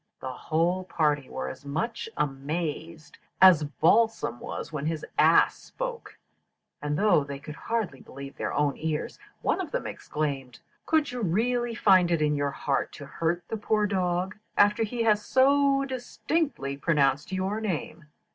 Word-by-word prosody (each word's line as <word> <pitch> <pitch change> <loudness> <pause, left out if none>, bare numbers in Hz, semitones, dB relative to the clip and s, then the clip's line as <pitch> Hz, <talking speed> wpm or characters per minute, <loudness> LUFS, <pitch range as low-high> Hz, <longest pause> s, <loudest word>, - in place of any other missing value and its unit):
The 130 -1 -5
whole 170 +7 0
party 150 -6 0
were 65 - -4
as 65 - -8
much 220 +12 -3
amazed 155 +3 -3 0.2
as 180 -5 +7
Balsam 165 - +2
was - - -6
when 150 0 -2
his 160 -1 -3
ass - - +5
spoke; - - -7 0.6
and 150 0 -1
though 195 -7 +4
they 140 0 -6
could 150 +2 -9
hardly 210 - -3
believe 140 +1 -10
their - - -3
own 145 -1 +1
ears, 155 -1 -3 0.2
one - - +1
of - - -5
them - - -3
exclaimed, 135 -5 -4 0.3
'Could 310 -4 +2
you 245 -1 -4
really 235 +5 0
find 185 -5 +5
it 170 -2 +2
in 150 -1 +2
your 145 0 0
heart 140 0 -1
to 145 - -9
hurt 165 +4 -2
the 225 - -3
poor 210 0 +1
dog 185 -2 -1 0.2
after 205 +2 +4
he 230 +2 -1
has 210 -2 +3
so 275 +1 +3
distinctly 260 - -2
pronounced 145 0 +1
your 190 +3 -1
name?' 170 -5 -4
170 Hz, 155 wpm, -27 LUFS, 145-220 Hz, 0.6 s, as